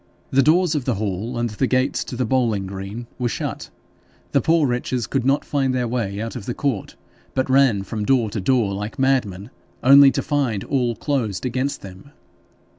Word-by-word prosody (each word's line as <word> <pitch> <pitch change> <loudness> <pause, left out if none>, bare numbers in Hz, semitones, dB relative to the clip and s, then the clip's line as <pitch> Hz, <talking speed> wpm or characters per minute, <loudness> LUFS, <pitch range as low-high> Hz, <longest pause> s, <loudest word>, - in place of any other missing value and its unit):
The 135 - +4
doors 165 +4 +3
of 145 -5 -2
the 125 - 0
hall 105 +4 -3
and 120 -1 -1
the 125 +5 0
gates 130 +2 +1
to - - -6
the 125 +1 -1
bowling 115 -5 +1
green 100 +5 -6
being 125 - 0
shut, - - -4 0.6
the - - +3
poor 165 -1 +3
wretches 125 -1 -1
could 135 +2 -1
not 140 +1 +2
find 135 -3 0
their 125 -1 0
way 110 -5 -2
out 115 +1 -4
of 115 -5 -7
the 120 - -3
court, 130 -9 -2 0.4
but 130 - +1
ran 130 -7 +4
from 105 +2 -4
door 120 -3 +2
to 105 - -3
door 115 -2 +1
like 105 +5 -5
madmen, 125 -6 0 0.3
only 140 +1 +8
to - - -2
find 130 -9 -1
all 125 -4 0
closed 115 - -2
against 130 +3 -2
them. 95 +6 -11
125 Hz, 190 wpm, -22 LUFS, 105-135 Hz, 0.6 s, only